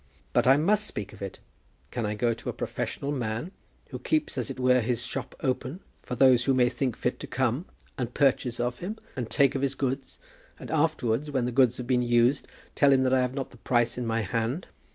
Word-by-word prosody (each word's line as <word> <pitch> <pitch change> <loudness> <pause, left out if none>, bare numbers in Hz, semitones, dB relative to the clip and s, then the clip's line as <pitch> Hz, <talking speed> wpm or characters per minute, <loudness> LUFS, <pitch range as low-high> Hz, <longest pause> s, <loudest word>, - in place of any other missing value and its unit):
"But - - +3
I 135 +2 +7
must 210 +7 +2
speak 100 -1 -5
of - - -14
it. 100 -1 -5 0.5
Can 120 -4 -2
I 105 - -2
go 115 +2 +1
to 115 - -6
a - - -2
professional 140 - -3
man, 120 +4 -3 0.4
who - - -5
keeps 310 -1 0
as - - -2
it 135 - -6
were 125 0 +4
his 120 +1 -1
shop 130 0 -5
open 130 +2 -2 0.2
for 125 - -5
those 125 -1 +5
who 135 - +3
may 125 -1 +4
think 130 -3 -2
fit 125 - -1
to - - -6
come, 130 +6 -1 0.3
and 125 -1 -2
purchase 130 -3 +1
of 120 0 -1
him, 205 +5 -5 0.2
and 125 -4 -4
take 140 -2 +3
of 135 - -2
his 140 -1 0
goods, 135 0 -3 0.4
and - - -8
afterwards, 150 -4 +1
when 130 -4 0
the 125 - -1
goods 125 -1 +4
have 125 - -5
been 125 -1 +2
used, 120 +3 +2 0.3
tell 140 -1 +4
him 130 -1 +4
that 130 0 +2
I 130 - +4
have 125 +1 -1
not 135 -2 -4
the 125 - -15
price 120 0 +1
in 125 -1 -3
my 115 0 0
hand? 115 - -2
125 Hz, 230 wpm, -27 LUFS, 120-140 Hz, 0.5 s, I